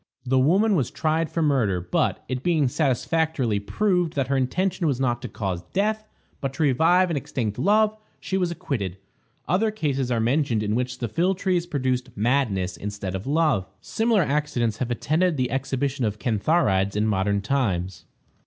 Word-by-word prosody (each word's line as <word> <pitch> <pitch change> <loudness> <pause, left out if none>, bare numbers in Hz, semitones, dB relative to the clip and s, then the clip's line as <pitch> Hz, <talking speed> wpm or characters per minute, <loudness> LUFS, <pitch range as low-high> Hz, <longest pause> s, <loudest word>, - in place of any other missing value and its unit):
The 130 +1 +2
woman 195 +11 +3
was 140 -10 +1
tried 155 +3 0
for 165 0 0
murder; 120 -11 +2
but, 90 +1 -1
it 130 -1 -3
being 160 -3 +2
satisfactorily 135 -3 0
proved 180 - 0
that 135 -2 -1
her 140 - +2
intention 170 +7 0
was 135 -4 0
not 120 -2 0
to 125 - -6
cause 95 -5 -3
death, 215 +2 0 0.3
but 135 -1 -4
to 160 - 0
revive 170 +6 +3
an 160 - 0
extinct 115 -6 -3
love, 215 +2 +3 0.2
she 190 - -4
was 180 -2 +1
acquitted. 115 - -3 0.5
Other 195 +7 +2
cases 140 - -1
are 120 -2 +1
mentioned 120 -1 +1
in 105 0 -1
which 125 +1 -1
the 120 - -3
philtres 180 - 0
produced 130 -5 -1
madness 105 -6 0
instead 100 -2 -5
of 95 +5 -5
love. 145 - +2
Similar 225 -4 +1
accidents 140 -7 0
have 125 - -2
attended 155 +7 +1
the 125 -1 0
exhibition 135 0 -1
of 105 -2 -1
cantharides 105 - +1
in 105 +1 +1
modern 100 -1 +1
times. 100 - -1
135 Hz, 170 wpm, -24 LUFS, 110-165 Hz, 0.5 s, woman